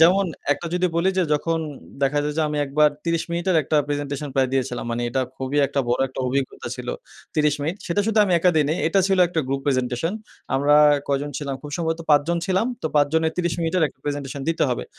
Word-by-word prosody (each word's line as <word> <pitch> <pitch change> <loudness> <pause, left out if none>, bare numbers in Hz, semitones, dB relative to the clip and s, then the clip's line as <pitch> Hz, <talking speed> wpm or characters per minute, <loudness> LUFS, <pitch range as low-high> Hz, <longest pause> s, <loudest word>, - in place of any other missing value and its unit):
যেমন 185 +4 +6 0.3
একটা 170 +4 -6
যদি 180 0 +2
বলি 170 +3 +2
যে - - +4
যখন 165 +2 +1 0.4
দেখা 140 +2 +2
যায় 150 0 -1
যে 160 - +2
আমি 150 - -3
একবার 150 +2 +4 0.2
৩০ 165 -1 0
মিনিটের 175 +1 +1
একটা 150 - 0
প্রেজেন্টেশন 145 0 -3
প্রায় 135 -2 +2
দিয়েছিলাম। 125 -2 -1
মানে 115 +1 -2
এটা 130 +2 0 0.2
খুবই 135 +2 -3
একটা 140 0 -1
বড় 120 - +1
একটা 130 - -6
অভিজ্ঞতা 135 +1 -2
ছিল। - - -7 0.5
৩০ 150 -1 +3
মিনিট। 160 +6 -2
সেটা 175 +4 +1
শুধু 225 -1 +1
আমি 185 - 0
একা 180 +2 +4
দেইনি। 150 +1 +2
এটা 195 +4 +3
ছিল 195 - +2
একটা 165 -2 -1
গ্রুপ 135 0 -1
প্রেজেন্টেশন। 130 +4 0 0.4
আমরা 145 +2 +4 0.3
কয়জন 140 +1 -1
ছিলাম, 140 -2 -3
খুব 150 - -8
সম্ভবত 165 -1 -2
৫ 145 - +7
জন 170 0 +1
ছিলাম 190 +3 +1 0.2
তো - - 0
৫ 145 -1 +5
জনের 160 0 +2
৩০ 175 -2 0
মিনিট-এর 165 +2 +1
একটা - - -21
প্রেজেন্টেশন 145 -1 -4
দিতে 165 0 +1
হবে। 125 - -2
150 Hz, 215 wpm, -23 LUFS, 140-170 Hz, 0.5 s, ৫